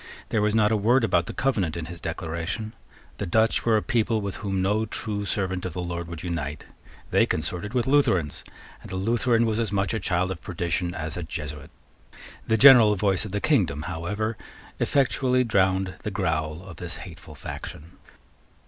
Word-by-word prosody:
There 110 - +1
was 105 +1 +2
not 105 -1 +4
a - - +3
word 115 +5 +3
about 85 -5 +2
the - - -3
Covenant 100 -12 0
in 85 - -4
his 85 0 -9
Declaration. 85 +6 -4 0.5
The - - -2
Dutch 110 +5 +2
were 115 -2 +4
a 105 - -1
people 115 -1 +1
with 100 -3 -4
whom 95 -2 -2
no 105 +4 +1
true 105 -1 -4
servant 95 -2 -2
of 90 - -4
the 90 - -3
Lord 85 -1 -4
would 85 -1 -7
unite. 75 -5 -4 0.5
They - - +4
consorted 90 +8 -3
with 120 -2 +2
Lutherans; 115 - +2 0.4
and - - -11
a - - -4
Lutheran 115 +4 +2
was 110 0 0
as 115 -4 0
much 100 +1 0
a 110 - 0
child 90 0 0
of 90 - -6
perdition 85 0 -2
as 80 +1 -4
a - - -3
Jesuit. 75 -3 -6 0.8
The 110 - +3
general 120 -4 +8
voice 95 0 +1
of 105 - -7
the 100 - -1
kingdom, 75 +2 +1
however, 100 +7 -3 0.4
effectually 130 -2 +2
drowned 95 -4 +1
the - - -3
growl 80 -4 -2
of 95 -2 -11
this - - -4
hateful - - -12
faction. 80 +3 -8
95 Hz, 185 wpm, -25 LUFS, 85-110 Hz, 0.8 s, general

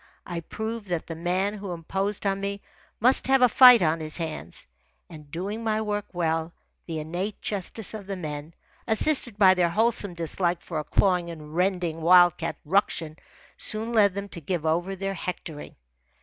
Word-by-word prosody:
I 175 - -4
proved 220 +5 -6
that 175 -3 -2
the 165 - -6
man 180 +5 -1
who 200 -3 -6
imposed 195 +5 -3
on 195 0 0
me 200 0 -4 0.4
must 255 +4 +3
have 265 -1 +4
a - - +8
fight 250 -2 +8
on 160 0 +1
his 155 -1 -1
hands. 155 - -5 0.5
And 150 -3 -12
doing 195 +8 -4
my 220 -1 0
work 210 -1 -3
well, 165 -1 -1 0.3
the 165 -2 -4
innate 175 +7 -4
justice 205 +1 -2
of 205 -3 -8
the 200 - -3
men, 155 -2 -7 0.3
assisted 240 -1 +3
by 190 -3 +7
their 180 -2 +2
wholesome 210 -1 0
dislike 170 +1 -1
for 160 -3 -4
a - - -3
clawing 180 +2 +1
and 155 -2 -9
rending 180 -3 0
wild 175 +1 +6
cat - - -4
ruction, 165 -3 0 0.4
soon 220 +2 -1
led 200 -4 +4
them 200 0 -4
to 170 - -6
give 160 +1 -3
over 175 +4 0
their 195 +1 -3
hectoring. 165 -4 -6
180 Hz, 175 wpm, -26 LUFS, 165-205 Hz, 0.5 s, a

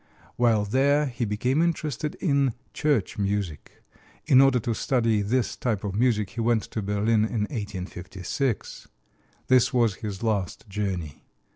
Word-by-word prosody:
While 115 -4 +3
there 140 +7 +3
he 120 -3 -3
became 125 +8 0
interested 155 -3 -1
in 140 - +1 0.2
church 140 -10 0
music. 100 -6 -3 0.4
In 130 0 +6
order 135 -2 +5
to 115 - -1
study 115 -3 +1
this 120 +5 0
type 110 -6 -2
of 100 -2 -3
music 105 -2 +1
he 115 - -4
went 115 -1 +2
to 110 - -2
Berlin 105 +2 +1
in 110 0 -1
1856. 100 - -4 0.6
This 130 0 +4
was 115 -6 +2
his 105 -1 -5
last 105 -3 -2
journey. 95 -7 -4
115 Hz, 140 wpm, -26 LUFS, 100-130 Hz, 0.6 s, In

